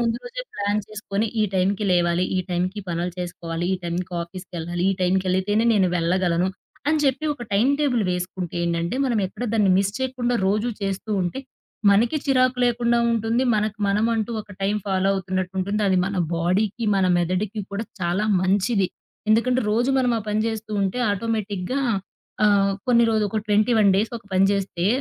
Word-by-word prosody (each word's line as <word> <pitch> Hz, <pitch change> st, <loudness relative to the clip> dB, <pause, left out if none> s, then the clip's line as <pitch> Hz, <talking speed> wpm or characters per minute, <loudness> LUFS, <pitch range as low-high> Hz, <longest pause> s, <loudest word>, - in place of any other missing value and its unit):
ముందు 230 Hz, -1 st, +1 dB
రోజే -, -, -6 dB
ప్లాన్ 205 Hz, +1 st, 0 dB
చేసుకొని, 215 Hz, 0 st, -2 dB
ఈ -, -, +4 dB
టైంకి 195 Hz, +3 st, +1 dB
లేవాలి, 175 Hz, 0 st, +2 dB
ఈ -, -, +2 dB
టైంకి 180 Hz, +4 st, -1 dB
పనులు 175 Hz, +1 st, -2 dB
చేసుకోవాలి, 170 Hz, -1 st, -4 dB
ఈ -, -, -2 dB
టైంకి 180 Hz, +2 st, -3 dB
ఆఫీస్‌కెళ్ళాలి, 175 Hz, -1 st, -6 dB
ఈ -, -, +2 dB
టైంకేళితేనే 190 Hz, +4 st, +1 dB
నేను 190 Hz, -3 st, +3 dB
వెళ్ళగలను 175 Hz, +1 st, +1 dB, 0.4 s
అని 310 Hz, +1 st, +3 dB
చెప్పి 270 Hz, +2 st, +1 dB
ఒక 245 Hz, -, -9 dB
టైమ్ 220 Hz, +7 st, +3 dB
టేబుల్ 255 Hz, -6 st, +2 dB
వేసుకుంటే 180 Hz, -1 st, -4 dB
ఏంటంటే, 170 Hz, +5 st, -1 dB
మనం 240 Hz, -4 st, +1 dB
ఎక్కడ 215 Hz, +6 st, -6 dB
దాన్ని 210 Hz, -4 st, +3 dB
మిస్ 200 Hz, 0 st, +1 dB
చేయకుండా 255 Hz, -2 st, -1 dB
రోజు 210 Hz, +4 st, +1 dB
చేస్తూ 195 Hz, +2 st, -3 dB
ఉంటే 180 Hz, +9 st, -3 dB, 0.5 s
మనకి 230 Hz, +8 st, +3 dB
చిరాకు 255 Hz, -2 st, +2 dB
లేకుండా 235 Hz, 0 st, +2 dB
ఉంటుంది. 230 Hz, +2 st, +1 dB
మనకు 215 Hz, +1 st, -1 dB
మనమంటూ 220 Hz, +2 st, +1 dB
ఒక 210 Hz, -, -14 dB
టైం 200 Hz, +2 st, +1 dB
ఫాలో 190 Hz, -1 st, +1 dB
అవుతున్నట్టు 185 Hz, -1 st, -2 dB
ఉంటుంది. 200 Hz, +3 st, -1 dB
అది 190 Hz, -, +3 dB
మన 195 Hz, +1 st, -3 dB, 0.2 s
బాడీకి 195 Hz, +7 st, 0 dB
మన 190 Hz, -1 st, +2 dB
మెదడుకి 185 Hz, +5 st, -1 dB
కూడా 200 Hz, +3 st, -3 dB, 0.2 s
చాలా 175 Hz, +4 st, 0 dB, 0.2 s
మంచిది. 195 Hz, +2 st, +2 dB, 0.4 s
ఎందుకంటే 245 Hz, +4 st, +3 dB
రోజు 240 Hz, +5 st, +2 dB
మనం 250 Hz, -2 st, +2 dB
ఆ -, -, -4 dB
పని 210 Hz, +1 st, +1 dB
చేస్తూ 220 Hz, -1 st, -4 dB
ఉంటే 195 Hz, +5 st, -1 dB
ఆటోమేటిక్‌గా 210 Hz, +1 st, -2 dB, 0.7 s
ఆహ్, 200 Hz, -1 st, +4 dB
కొన్ని 235 Hz, -2 st, +5 dB
రోజులు, 215 Hz, -1 st, +2 dB
ఒక 220 Hz, -, -1 dB
21 210 Hz, 0 st, +4 dB
డేస్ 215 Hz, +3 st, +1 dB
ఒక -, -, -26 dB
పని 190 Hz, +1 st, +4 dB
చేస్తే 190 Hz, -3 st, -1 dB
200 Hz, 165 wpm, -23 LUFS, 185-225 Hz, 0.7 s, కొన్ని